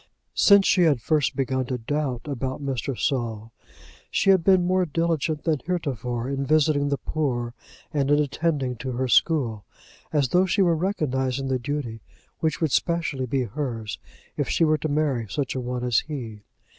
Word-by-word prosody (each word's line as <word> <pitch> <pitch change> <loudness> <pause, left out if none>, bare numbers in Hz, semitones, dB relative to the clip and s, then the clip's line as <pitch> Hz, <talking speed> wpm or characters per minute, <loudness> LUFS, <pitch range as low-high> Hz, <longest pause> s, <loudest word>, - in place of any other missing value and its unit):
Since 200 -1 +6
she 185 - +4
had 155 -7 +4
first 150 +3 +1
begun 130 -1 0
to 125 - -2
doubt 130 0 -2
about 135 -2 -3
Mr. 135 -1 -2
Saul, 115 -4 -2 0.6
she 195 - +3
had 190 -3 +4
been 185 -1 +4
more 185 +1 +2
diligent 160 -2 -1
than 160 -4 +1
heretofore 125 - -2
in 140 0 -2
visiting 145 -1 +2
the 140 - 0
poor 120 -7 -2 0.4
and 140 -2 +1
in 145 - +5
attending 145 -3 0
to 130 +2 -4
her 130 +2 -1
school, 120 -7 +2 0.5
as 145 -4 +2
though 180 +5 +3
she 190 +2 +3
were 170 -2 +3
recognizing 135 -7 -1
the 130 -1 0
duty 125 -4 -4 0.4
which 155 -3 0
would 160 -4 +1
specially 165 -7 0
be 130 +1 0
hers 115 -5 -4 0.4
if - - -1
she 165 - +3
were 155 -1 +2
to 155 - -2
marry 145 -6 0
such 140 +2 -2
a 130 - -3
one 125 0 -3
as 125 -2 +3
he. 120 -8 -6
140 Hz, 175 wpm, -25 LUFS, 125-155 Hz, 0.6 s, Since